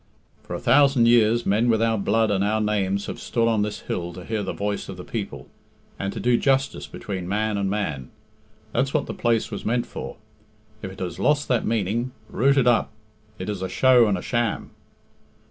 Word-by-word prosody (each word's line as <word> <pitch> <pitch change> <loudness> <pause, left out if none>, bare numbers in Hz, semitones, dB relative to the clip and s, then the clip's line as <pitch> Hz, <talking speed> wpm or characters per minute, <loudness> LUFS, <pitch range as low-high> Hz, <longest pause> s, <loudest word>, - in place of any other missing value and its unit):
"For - - -6
a - - -4
thousand 135 -4 +4
years 120 0 +4
men 110 +5 +2
with 110 -1 +3
our 115 0 +2
blood 110 +2 +1
and 100 -1 +1
our 105 +2 +1
names 100 -2 0
have - - -6
stood 115 -2 0
on 110 -2 +2
this 105 0 -3
hill 85 0 -4
to 90 0 -9
hear 110 -2 -2
the 95 - -3
voice 100 0 -3
of - - -7
the - - -7
people, - - -5 0.5
and 100 - -2
to - - -6
do 120 +2 +2
justice 135 - +1
between 95 +4 -6
man 105 +1 0
and 100 -1 -1
man. 80 -11 -3 0.6
That's 135 +4 0
what 150 - +1
the - - -5
place 115 -2 0
was 100 - -5
meant 120 +2 0
for. - - -7 0.6
If 95 - -6
it 95 - -12
has 90 -2 -4
lost 145 0 +2
that 125 -3 +1
meaning, 115 +3 -1 0.2
root 140 +3 +2
it 135 - +4
up 120 -2 +3 0.5
it - - -6
is 105 -3 -3
a 95 - -3
show 125 -3 +5
and 100 -2 +1
a - - -7
sham." 120 -3 -1
110 Hz, 210 wpm, -24 LUFS, 100-120 Hz, 0.6 s, show